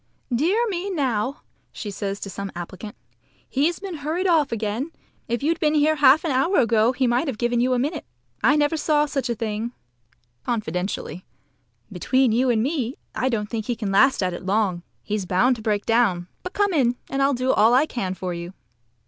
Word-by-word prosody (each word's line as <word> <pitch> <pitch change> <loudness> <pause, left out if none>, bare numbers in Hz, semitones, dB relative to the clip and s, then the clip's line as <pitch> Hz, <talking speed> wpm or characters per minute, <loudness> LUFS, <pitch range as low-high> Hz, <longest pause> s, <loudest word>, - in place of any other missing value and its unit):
"Dear 360 - +2
me, 385 -1 -3
now!" 265 - -1 0.3
she 205 - -6
says 200 0 -4
to 195 - -5
some 200 +1 -5
applicant. 185 +6 -7 0.5
"He's 305 +6 +1
been 380 -4 -6
hurried 315 +6 -2
off 325 -6 +3
again. 225 +6 -2 0.4
If 235 +3 -2
you'd 330 +2 +1
been 310 -3 +2
here 305 +1 +3
half 285 +1 +6
an 320 - 0
hour 275 +9 +2
ago 230 0 +3
he 260 0 0
might 245 +6 +1
have 260 -6 -3
given 240 +1 0
you 255 +1 +2
a - - +1
minute. 295 +5 -2 0.4
I 265 +6 +5
never 295 +1 +2
saw 300 -1 +2
such 275 -3 -3
a 235 - 0
thing" 225 +1 -3 0.7
(confidentially). 185 -4 -3 0.7
"Between 255 +7 +2
you 250 +3 +2
and 225 -2 +2
me 270 -3 -1 0.2
I 260 - 0
don't 215 -4 -1
think 220 -1 -4
he 240 - 0
can 210 -3 -3
last 230 +2 +4
at 180 -1 -1
it 175 - -7
long. 195 -2 0 0.2
He's 205 -3 -3
bound 245 +9 +3
to - - -9
break 210 -2 -1
down. 210 -7 +2
But 365 - -7
come 405 -2 +1
in, 250 -6 +2
and 275 - -2
I'll 275 0 +3
do 255 +1 +1
all 225 +3 +5
I 275 +4 +5
can 195 -10 -3
for 185 -1 -4
you." 170 +2 -7
245 Hz, 200 wpm, -23 LUFS, 210-290 Hz, 0.7 s, half